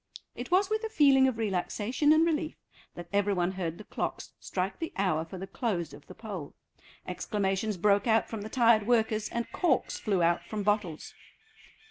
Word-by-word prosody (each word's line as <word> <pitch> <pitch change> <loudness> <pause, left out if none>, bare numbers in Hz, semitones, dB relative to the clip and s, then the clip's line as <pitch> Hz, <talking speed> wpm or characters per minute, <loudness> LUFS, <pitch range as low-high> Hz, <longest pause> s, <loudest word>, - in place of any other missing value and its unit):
It - - -7
was 375 +2 +3
with 435 +2 -1
a 445 - -2
feeling 275 -9 +5
of 255 -4 -1
relaxation 220 - 0
and 315 +1 +5
relief 320 -1 -1 0.4
that 175 0 -8
every 200 0 +2
one 175 0 +1
heard 175 -3 -4
the - - -10
clocks - - -4
strike 185 +1 -3
the 325 - -4
hour 185 -5 +1
for 175 +3 -9
the 190 - -5
close 190 - -3
of 145 0 -13
the - - -11
poll. 195 -10 -7 0.5
Exclamations 200 0 -1
broke 200 +4 +3
out 225 -1 +3
from 220 -2 -5
the 215 - -6
tired 230 -3 +4
workers, 220 -3 +2
and 235 0 -3
corks 320 -8 0
flew 195 -5 +1
out 170 +1 +2
from 210 -1 -4
bottles. 205 -6 -1
210 Hz, 185 wpm, -29 LUFS, 190-245 Hz, 0.5 s, feeling